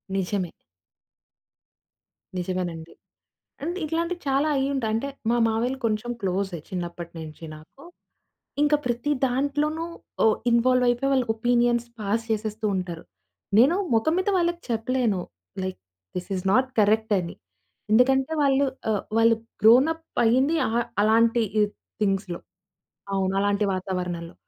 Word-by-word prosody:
నిజమే. 190 -1 -1 1.9
నిజమేనండి. 175 -3 -4 0.7
అంటే 345 +4 -2
ఇట్లాంటివి 335 +3 -2
చాలా 275 +3 +2
అయ్యింటాయి. 270 -4 0
అంటే 230 +5 -1 0.2
మా 240 - +2
మావయ్యలు 240 +4 -1
కొంచెం 220 +2 -1
క్లోజే 190 -2 -1
చిన్నప్పటి 175 -2 -5
నుంచి 160 0 -9
నాకు. 155 - -16 0.8
ఇంక 295 0 +4
ప్రతి 240 +4 -1 0.2
దాంట్లోనూ 290 +5 0 0.4
ఓ - - +6 0.2
ఇన్వాల్వ్ 250 +2 +3
అయిపోయి 245 +3 +1
వాళ్ళ 260 -2 +3
ఒపీనియన్స్ 240 +1 +2
పాస్ 215 +2 -1
చేసేస్తూ 215 0 -2
ఉంటారు. 175 -3 -5 0.5
నేను 275 +10 +6 0.2
మొఖం 230 +9 +2
మీద 375 - 0
వాళ్ళకి 345 0 0
చెప్పలేను. 230 -3 0 0.4
Like 185 0 -4 0.4
this 180 +2 -5
is 185 - -5
not 255 +4 +3
correct 220 +2 +2
అని. 170 -1 -6 0.6
ఎందుకంటే 265 +5 +4
వాళ్ళు 275 0 +3 0.2
ఆహ్, 210 -2 0 0.2
వాళ్ళు 230 0 +5 0.3
గ్రోనప్ 275 +9 +5 0.2
అయ్యింది 260 +7 +3
అ - - -2 0.3
అలాంటి 230 +2 +4 0.2
ఈ - - +6 0.4
థింగ్స్‌లో. 195 -3 0 0.8
అవును. 190 0 0
అలాంటి 205 +1 +1
వాతావరణంలో. 180 -2 -4
225 Hz, 120 wpm, -25 LUFS, 190-265 Hz, 1.9 s, ఓ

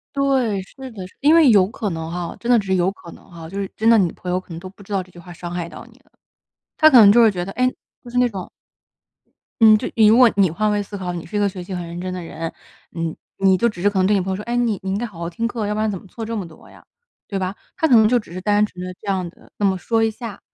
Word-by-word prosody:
对， 260 -8 +1
是 260 +6 -11
的， 195 -4 -8
是。 - - -26
因 295 +3 +5
为 320 -6 +6
有 200 -4 +5
可 210 0 -4
能 160 -1 -5
哈， 175 0 -5
真 240 - -3
的 245 - +7
只 205 - -1
是 190 - +2
有 180 0 +2
可 175 -3 -13
能 - - -16
哈， 165 -1 -9
就 195 +4 -5
是 195 - -3
真 225 +2 +3
的 230 - +6
你 180 -5 +2
朋 180 - -7
友 180 - +1
可 185 - -13
能 165 0 -7
都 185 +1 -9
不 200 - -25
知 200 +1 -11
道 195 -1 0
这 185 - -18
句 175 - -16
话 175 +1 -11
伤 175 0 -8
害 175 -1 -4
到 - - -11
你 235 +1 -21
了。 - - -32 0.7
他 310 - +6
可 255 -6 +8
能 200 -2 +9
就 235 - +5
会 225 -2 +6
觉 175 -2 -3
得， 195 - -6
唉， 255 0 +2 0.4
就 240 - -11
是 250 - -3
那 250 -1 +3
种 195 -5 -7 1.1
嗯， 220 -1 +8
就 240 - -4
你 220 -2 +6
如 225 +3 +6
果 245 -3 +7
你 195 -4 +4
换 210 +6 0
位 205 0 0
思 200 0 -8
考， 180 -2 -4
你 170 -2 -6
是 210 - -6
一 - - +2
个 205 -1 +2
学 185 -2 -7
习 185 - -9
很 175 -1 -4
认 170 +1 -7
真 185 0 -4
的 180 - -5
人， 165 0 -6 0.4
你 165 -1 -4 0.2
你 190 -1 +4
就 235 +5 +2
只 180 -5 -7
是 205 - +4
可 200 - -2
能 185 - +3
对 210 - +3
你 200 - +2
朋 190 +1 -3
友 - - -2
说： 205 - -6
“哎， 240 +1 -1
你 230 -4 0
你 190 - -3
应 195 - -1
该 240 - -2
好 190 -7 -13
好 170 - -4
听 230 +7 -2
课， 230 -3 -3
要 210 - -1
不 215 - -2
然 220 - +1
怎 195 - -4
么 - - -17
错 225 +4 -7
这 230 +1 -4
么 195 -4 -4
多 165 - -16
呀？” - - -18 0.4
对 200 - -3
吧？ 185 0 -3 0.2
他 325 - +2
可 250 - +6
能 220 -1 +6
就 245 +1 +3
只 210 - -11
是 185 - -6
单 205 +2 +2
纯 180 -3 -9
地 185 - -5
这 210 - -14
样 185 -2 -1
地 - - -22
那 205 - -2
么 190 -1 +2
说 225 +4 0
一 225 - +2
下， 220 -2 -8
200 Hz, 355 characters per minute, -21 LUFS, 180-225 Hz, 1.1 s, 能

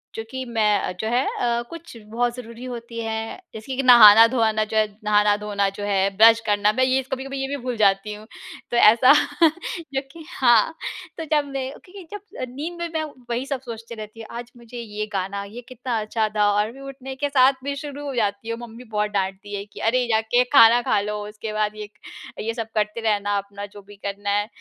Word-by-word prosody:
जो 225 - -4
कि 260 0 -5
मैं 210 -5 +1
जो 220 - -2
है 245 +3 +2 0.2
अ, 235 -1 +1
कुछ 335 -5 -10 0.2
बहुत 240 +1 0
ज़रूरी 240 0 -9
होती 235 -2 -7
हैं, 225 +7 -4
जैसे 220 +5 -6
कि 270 - -1
नहाना-धोआना 225 -1 +7
जो 220 +1 -3
है 215 - +4 0.2
नहाना-धोना 210 -1 +2
जो 200 +1 -8
है, 195 -1 +1
ब्रश 225 +1 +7
करना, 205 0 +2
मैं 260 - +2
ये 260 +1 +2
कभी-कभी 270 +1 -4
ये 270 - -2
भी 285 +1 -3
भूल 250 -1 -2
जाती 200 0 +2
हूँ। 210 +1 -11 0.5
तो 240 - +1
ऐसा 235 +3 +7 0.8
जो 270 - 0
कि 325 0 -12
हाँ, 240 +4 +4 0.4
तो 325 - -5
जब 295 -1 +3
मैं 265 -1 -3 0.2
क्योंकि 380 +1 -12
जब 415 -1 -7 0.3
नींद 335 +5 -5
में 340 - -2
मैं 315 - -1 0.3
वही 240 +3 -2
सब 275 -2 -4
सोचती 230 -1 -8
रहते 215 +1 -10
हूँ, 225 - -9
आज 240 0 -8
मुझे 240 +1 -12
ये 215 -2 -5
गाना, 195 +1 -3
ये 220 +5 -9
कितना 245 -2 -3
अच्छा 215 +1 -1
था, 210 -1 +2
और 210 +2 0
मैं 270 +2 -13
उठने 270 -1 -8
के 285 +1 -2
साथ 265 -1 +5
भी 280 0 -3
शुरू 290 0 -7
हो 270 - -4
जाती 210 0 -1
हूँ। 230 +1 -3
मम्मी 230 +2 -12
बहुत 210 0 0
डाँटती 195 +1 -3
है 200 - -4
कि, 210 - -13
"अरे, 245 +2 +1
जा 220 0 +3
के 250 +1 +6
खाना 235 -2 +8
खा 215 -3 +1
लो, 210 +1 -3
उसके 215 +1 -7
बाद 215 0 -1
ये 210 -1 -7
क 210 - -34 0.4
ये 225 +2 -2
सब 225 -1 -4
करते 215 +2 -1
रहना, 205 -2 0
अपना 200 0 -6
जो 205 0 -13
भी 205 +1 -15
करना 200 0 -4
है 205 +1 +1
225 Hz, 215 wpm, -23 LUFS, 210-255 Hz, 0.8 s, खाना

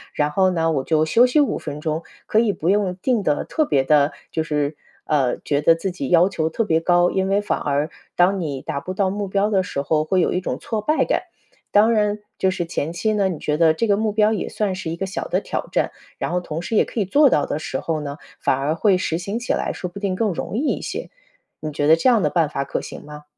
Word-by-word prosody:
然 150 0 +1
后 190 +4 +3
呢 165 -2 +1
我 135 -4 0
就 155 +2 +2
休 235 +10 +5
息 250 +4 +2
5 290 - +1
分 145 - -6
钟。 155 +1 -2 0.2
可 215 - +2
以 225 -2 +3
不 165 - -5
用 195 -1 +2
定 230 +4 0
得 150 -6 0
特 315 - 0
别 140 - +2
地 145 +1 +3 0.2
就 160 - -1
是， 150 -1 -1 0.3
呃， 135 -5 +1
觉 145 0 -1
得 165 +2 +5
自 185 +3 -3
己 175 -7 -5
要 175 +2 +5
求 160 -5 -1
特 225 - -1
别 160 -6 +2
高， 175 +1 +3
因 190 0 0
为 200 +1 +2
反 210 - -1
而 145 +2 -1 0.3
当 190 +2 +3
你 145 -6 -3
达 140 - -3
不 185 +6 -6
到 190 0 +1
目 200 +1 -3
标 200 +2 +1
的 195 -3 +2
时 180 -6 -3
候， 155 +2 +1
会 185 +4 +1
有 - - +1
一 180 - +1
种 - - -3
挫 220 -2 -3
败 305 +8 +2
感。 - - 0 0.5
当 210 +3 +5
然 210 -2 +1 0.2
就 190 - +2
是 185 -2 -3
前 165 -1 -3
期 215 +6 0
呢， 200 -2 +2
你 175 - -3
觉 150 0 -1
得 160 -1 +5
这 160 - -1
个 200 -1 +3
目 215 0 0
标 210 0 +3
也 215 - -2
算 205 -3 -1
是 185 -3 -5
一 165 - -3
个 195 - -3
小 195 +2 -4
的 - - 0
挑 - - -4
战， - - +1 0.3
然 - - -3
后 180 - +1
同 165 -2 -5
时 200 +6 -3
也 - - +4
可 - - -5
以 - - 0
做 285 +8 +5
到 150 - +2
的 150 - -3
时 135 -3 -4
候 160 -2 -2
呢， 145 0 -6 0.2
反 - - +2
而 145 +4 -1
会 190 +2 +3
实 165 -3 -1
行 195 +5 -4
起 245 - -3
来， - - -1
说 180 - -5
不 175 - -9
定 200 -2 -1
更 210 +1 0
容 180 - -5
易 - - 0 0.2
一 - - -8
些， - - -5 0.5
你 155 - -4
觉 145 0 -1
得 160 - +7
这 210 - +3
样 235 -4 +4
的 - - +2
办 165 -3 +2
法 140 -2 -2
可 140 - -3
行 - - -9
吗？ 150 0 -10
180 Hz, 290 characters per minute, -21 LUFS, 155-205 Hz, 0.5 s, 得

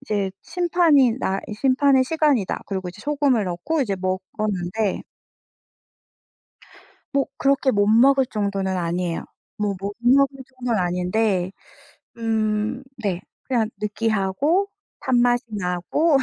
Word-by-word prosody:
이제 205 -7 -1
심판이 335 -8 +3
나 195 -6 -1
'이 210 - -6
심판의 265 +3 +3
시간이다.' 290 - +1
그리고 190 -2 -3
이제 180 +3 -10
소금을 280 -6 +1
넣고 190 - -1
이제 205 -6 -1
먹었는데 190 +1 -2 2.1
뭐 275 -1 +2
그렇게 275 -1 +2
못 205 -2 +2
먹을 265 +5 +5
정도는 200 -4 -2
아니에요. 175 0 -2 0.3
뭐 205 -2 -1
못 200 +1 -4
먹을 270 +3 +4 0.2
정도는 245 -4 0
아닌데 180 +1 0 0.7
음 220 +1 -1 0.2
네 190 -4 -1 0.2
그냥 235 -4 0
느끼하고 215 - 0 0.3
단맛이 245 -2 +2
나고 190 - +1
220 Hz, 250 characters per minute, -23 LUFS, 190-270 Hz, 2.1 s, 먹을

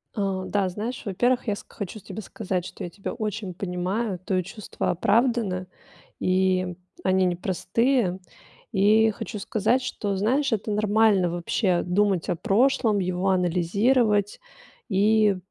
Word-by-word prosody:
Э, 195 -2 -1
да, 195 -2 0
знаешь, 220 +7 -5
во-первых, 245 +5 +1
я 205 - +1
ск - - -13
хочу 200 +2 -6
тебе 195 +3 -8
сказать, 185 -4 -3
что - - -8
я 175 - -4
тебя 195 +3 -6
очень 210 -3 -4
понимаю, 185 +2 -2
твое 185 0 -1
чувство 205 +3 -5
оправдано, 210 -1 +1 0.5
и 185 -1 +1 0.3
они 185 0 +3
непростые. 190 +4 0 0.5
И 215 +2 +4
хочу 210 +1 -6
сказать, 220 +6 +1
что, 205 -6 -3
знаешь, 255 +8 +1
это 215 0 -1
нормально 210 -3 +3
вообще 175 +1 0
думать 190 0 +1
о 175 - +1
прошлом, 215 +2 +2
его 185 +1 0
анализировать 200 +5 +2 0.5
и 210 0 +3
200 Hz, 130 wpm, -25 LUFS, 185-220 Hz, 0.5 s, И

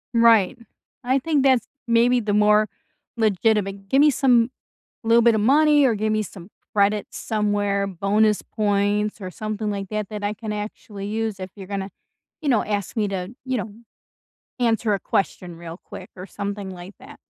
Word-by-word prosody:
Mm 230 - +4
right. 225 -5 +5 0.5
I 260 +2 +2
think 290 -1 +1
that's 260 -3 +3 0.2
maybe 235 +2 +4
the 210 -3 -1
more 210 +1 +4 0.5
legitimate 200 -2 +1
give 270 - +4
me 300 - +7
some 245 -3 +3 0.5
little 230 +1 +5
bit 235 -1 +5
of 215 - +1
money 295 +4 +5
or 235 -4 +3
give 215 +1 -1
me 215 0 +1
some 185 -2 -11 0.3
credit 205 0 +2
somewhere, 205 -2 -1
bonus 205 +3 +1
points, 205 0 0
or 185 -1 -6
something 215 +1 -4
like 195 -1 -4
that 215 -2 -3
that 210 -1 -6
I 205 +1 0
can 215 0 -5
actually 210 -1 -6
use 220 -1 -2
if 185 0 -6
you're 195 -3 -10
gonna, 195 -1 -4 0.5
you 300 - -1
know, 235 -5 +3
ask 205 0 -3
me 215 -3 +1
to, 190 +2 -4
you 260 -1 -1
know, 215 -1 -5 0.9
answer 230 -3 +1
a 195 - -3
question 175 -2 -2
real 170 0 -9
quick 185 - -10
or 185 +1 -8
something 200 -1 -5
like 185 +2 -10
that. - - -13
210 Hz, 180 wpm, -23 LUFS, 200-230 Hz, 0.9 s, me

